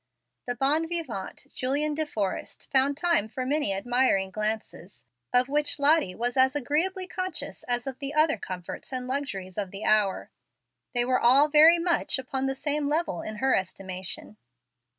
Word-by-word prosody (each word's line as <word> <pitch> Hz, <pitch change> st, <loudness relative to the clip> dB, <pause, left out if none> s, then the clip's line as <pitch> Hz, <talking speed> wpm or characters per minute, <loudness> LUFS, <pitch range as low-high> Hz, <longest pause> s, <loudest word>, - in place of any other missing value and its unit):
The 245 Hz, -, -1 dB
bon 290 Hz, +6 st, +2 dB
vivant, 285 Hz, -, -5 dB
Julian 285 Hz, +4 st, -1 dB
De 310 Hz, +1 st, -2 dB
Forrest, 205 Hz, -8 st, -4 dB
found 275 Hz, +1 st, +3 dB
time 340 Hz, -, +2 dB
for 255 Hz, +3 st, -4 dB
many 290 Hz, -4 st, 0 dB
admiring 195 Hz, -2 st, +1 dB
glances, 210 Hz, -, -4 dB, 0.3 s
of 250 Hz, 0 st, +4 dB
which 295 Hz, +1 st, +2 dB
Lottie 285 Hz, -, +2 dB
was 245 Hz, +2 st, -2 dB
as 265 Hz, +1 st, +3 dB
agreeably 330 Hz, +8 st, -1 dB
conscious 360 Hz, -6 st, -4 dB
as 245 Hz, 0 st, +1 dB
of 265 Hz, -2 st, -6 dB
the 280 Hz, -1 st, -3 dB
other 305 Hz, -3 st, +3 dB
comforts 185 Hz, +2 st, -7 dB
and 255 Hz, -1 st, -3 dB
luxuries 210 Hz, -9 st, -4 dB
of 200 Hz, -2 st, -3 dB
the 195 Hz, +2 st, -7 dB
hour. 210 Hz, -3 st, +1 dB, 0.6 s
They 240 Hz, 0 st, +4 dB
were 255 Hz, 0 st, +2 dB
all 270 Hz, +5 st, +5 dB
very 315 Hz, +3 st, +7 dB
much 340 Hz, -3 st, +1 dB
upon 265 Hz, +1 st, -3 dB
the 270 Hz, -, -2 dB
same 290 Hz, +1 st, -1 dB
level 300 Hz, -, -1 dB
in 215 Hz, -, -6 dB
her 265 Hz, +5 st, +1 dB
estimation. 185 Hz, +2 st, -5 dB
265 Hz, 165 wpm, -26 LUFS, 215-300 Hz, 0.6 s, very